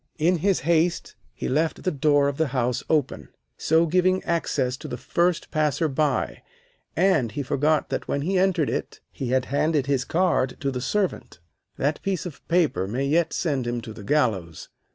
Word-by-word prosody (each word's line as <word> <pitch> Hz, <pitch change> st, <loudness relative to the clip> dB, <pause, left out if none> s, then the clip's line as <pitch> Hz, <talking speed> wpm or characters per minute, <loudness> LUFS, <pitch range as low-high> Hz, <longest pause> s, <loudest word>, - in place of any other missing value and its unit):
In 175 Hz, +3 st, +2 dB
his 195 Hz, +2 st, +1 dB
haste 170 Hz, +2 st, +1 dB, 0.2 s
he -, -, -5 dB
left 155 Hz, +4 st, 0 dB
the 185 Hz, -, +1 dB
door 145 Hz, 0 st, +3 dB
of 140 Hz, -1 st, -2 dB
the 160 Hz, -, +1 dB
house 120 Hz, -1 st, 0 dB
open, 150 Hz, -5 st, 0 dB, 0.3 s
so 160 Hz, +1 st, +2 dB
giving 185 Hz, +3 st, +2 dB
access 145 Hz, -7 st, 0 dB
to 155 Hz, -, -8 dB
the 125 Hz, -3 st, -5 dB
first 170 Hz, +6 st, 0 dB
passer 155 Hz, +1 st, +1 dB
by, 135 Hz, -, -1 dB, 0.5 s
and 160 Hz, -, +2 dB
he 145 Hz, -, -3 dB
forgot 150 Hz, +4 st, +1 dB
that -, -, -3 dB
when 140 Hz, -, -1 dB
he 190 Hz, +5 st, -1 dB
entered 180 Hz, -6 st, +2 dB
it -, -, -4 dB
he 130 Hz, -, -5 dB
had 130 Hz, 0 st, +1 dB
handed 150 Hz, -1 st, +2 dB
his 135 Hz, -3 st, +1 dB
card 165 Hz, -6 st, +1 dB
to 140 Hz, -, -1 dB
the 125 Hz, -1 st, -4 dB
servant. 195 Hz, +8 st, -2 dB, 0.4 s
That 145 Hz, +2 st, -1 dB
piece 190 Hz, -3 st, -2 dB
of 155 Hz, -6 st, -8 dB
paper 165 Hz, -, +1 dB
may 125 Hz, +7 st, -2 dB
yet 160 Hz, +4 st, +2 dB
send 140 Hz, -7 st, -1 dB
him 120 Hz, 0 st, -1 dB
to 110 Hz, -, -8 dB
the 105 Hz, -, -10 dB
gallows. 100 Hz, -, -1 dB
150 Hz, 185 wpm, -24 LUFS, 130-170 Hz, 0.5 s, door